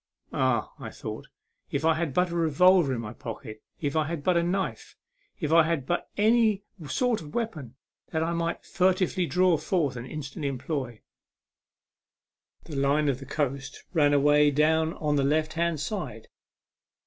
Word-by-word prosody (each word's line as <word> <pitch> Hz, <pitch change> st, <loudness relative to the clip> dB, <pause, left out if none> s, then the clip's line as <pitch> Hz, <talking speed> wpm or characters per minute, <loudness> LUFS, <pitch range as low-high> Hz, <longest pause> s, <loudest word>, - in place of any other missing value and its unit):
" -, -, -26 dB
Ah/' 130 Hz, -4 st, +1 dB, 0.3 s
thought -, -, -7 dB
I, -, -, -40 dB, 0.2 s
" -, -, -43 dB
if 140 Hz, +3 st, 0 dB
I 165 Hz, -, +5 dB
had 160 Hz, -2 st, -2 dB
but 180 Hz, +5 st, +1 dB
a -, -, -3 dB
revolver 170 Hz, 0 st, +4 dB
in 115 Hz, -, -3 dB
my 105 Hz, -1 st, -7 dB
pocket, 110 Hz, -2 st, -8 dB, 0.2 s
if 145 Hz, -1 st, -2 dB
I 155 Hz, -1 st, +2 dB
had 160 Hz, -3 st, -4 dB
but 180 Hz, +2 st, +2 dB
a 170 Hz, -, +4 dB
knife, 185 Hz, +3 st, -2 dB, 0.4 s
if 155 Hz, -2 st, -1 dB
I 165 Hz, -, +8 dB
had 160 Hz, -4 st, 0 dB
but 175 Hz, +5 st, -2 dB
any 215 Hz, -1 st, +3 dB, 0.3 s
sort 245 Hz, -, +1 dB
of 150 Hz, -2 st, -11 dB
weapon 155 Hz, -, -4 dB, 0.4 s
that 160 Hz, 0 st, 0 dB
I 170 Hz, 0 st, 0 dB
could -, -, -26 dB
furtively 185 Hz, -1 st, +1 dB
draw 180 Hz, -1 st, +3 dB
forth 150 Hz, -6 st, 0 dB
and 120 Hz, +1 st, -6 dB
instantly 145 Hz, +1 st, -5 dB
employ! 130 Hz, -3 st, -4 dB, 0.8 s
" -, -, -47 dB
The 150 Hz, -, -6 dB
line 140 Hz, +2 st, +2 dB
of 135 Hz, -1 st, -2 dB
coast 140 Hz, -2 st, -3 dB
ran 150 Hz, -4 st, +4 dB
away 145 Hz, +1 st, +5 dB
down 160 Hz, +3 st, +2 dB
on 150 Hz, -1 st, 0 dB
the 140 Hz, -, +2 dB
left 155 Hz, +2 st, +1 dB
hand 170 Hz, -2 st, 0 dB
side. 145 Hz, -, -5 dB
155 Hz, 175 wpm, -27 LUFS, 140-175 Hz, 0.8 s, I